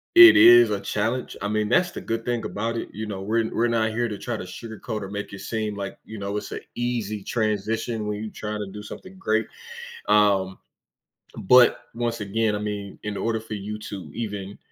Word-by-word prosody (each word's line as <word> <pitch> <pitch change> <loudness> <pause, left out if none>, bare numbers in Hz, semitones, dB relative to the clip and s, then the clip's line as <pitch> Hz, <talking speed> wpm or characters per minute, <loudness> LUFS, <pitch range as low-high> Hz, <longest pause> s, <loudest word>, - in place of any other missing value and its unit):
it 340 -2 +11
is 360 +2 +9
a - - 0
challenge, 115 +5 -2
I 105 - -1
mean, 105 0 0
that's 180 +7 +3
the - - -7
good 115 0 -3
thing 120 -2 -2
about 115 +3 -2
it, - - -4
you 110 +1 -4
know, 100 -3 -5
we're 110 +2 0
we're 120 +1 +2
not 115 -2 +1
here 120 +2 0
to 105 -3 -5
try 120 +1 -4
to - - -6
sugarcoat 110 +3 -6
or 100 - -6
make 105 0 -5
it 100 - -7
seem 110 0 -3
like, 100 -1 -5
you 110 - -8
know, 100 +1 -3
it's - - -5
a - - -4 0.2
easy 115 -4 -2
transition 110 0 -1
when 105 +1 -3
you 110 - -6
try 105 - -6
to 105 -2 -4
do 105 +1 -8
something 185 - -10
great, 110 - 0 0.6
um, 100 -3 +3 0.9
but, 125 +5 +6
once 115 -1 -2
again, 105 +1 0
I - - -2
mean, 105 -1 -5
in 105 -1 -3
order 115 -1 0
for 110 0 -7
you 105 +1 -5
to 100 -3 -7
even 100 -3 -5
110 Hz, 210 wpm, -24 LUFS, 105-115 Hz, 0.9 s, it